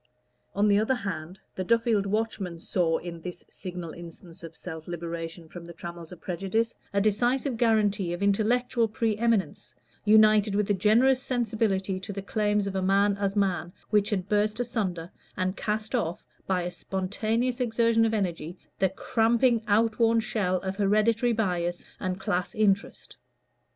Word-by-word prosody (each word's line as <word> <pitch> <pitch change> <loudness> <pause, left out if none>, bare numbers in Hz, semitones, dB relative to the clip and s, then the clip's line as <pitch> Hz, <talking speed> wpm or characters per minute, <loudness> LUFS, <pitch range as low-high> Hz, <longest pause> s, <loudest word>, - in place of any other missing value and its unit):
On 205 +1 +3
the 200 0 +4
other 220 +5 +1
hand, 190 -5 -5
the 185 - -3
Duffield 230 -1 +2
Watchman 200 -4 -2
saw 165 -1 0
in 170 -1 -7
this 180 +1 -8
signal 180 -3 -7
instance 170 0 -11
of 165 -1 -10
self 160 -3 -8
liberation 170 -1 -5
from 175 +2 -10
the 170 0 -10
trammels 170 -1 -9
of 180 - -10
prejudice, 195 +7 -1 0.2
a 200 - +1
decisive 240 +6 +1
guarantee 210 -5 +2
of 175 +3 -3
intellectual 230 +4 +2
pre 220 0 -1
eminence, 230 -3 0 0.3
united 215 -1 +5
with 210 0 +1
a - - +4
generous 235 +7 +4
sensibility 220 -7 -1
to 200 +2 -7
the 195 -1 -5
claims 210 0 0
of 195 - -3
man 200 +1 +3
as 200 0 -1
man, 185 -4 0 0.2
which 210 -1 +3
had 190 -4 -1
burst 210 +2 +1
asunder, 195 -9 -2 0.3
and 185 0 -1
cast 215 +1 -2
off, 180 -9 -2 0.2
by 185 -2 +1
a 175 - -3
spontaneous 215 +8 -2
exertion 230 -1 +2
of 225 - +2
energy, 175 -3 -3 0.2
the 190 - +3
cramping 230 +4 +2
out 215 +2 +2
worn 230 0 +4
shell 200 -4 0
of 190 0 -4
hereditary 215 +4 +2
bias 175 -6 -1
and 185 -1 -3
class 180 +3 -2
interest. 200 -2 0
200 Hz, 160 wpm, -27 LUFS, 180-225 Hz, 0.3 s, united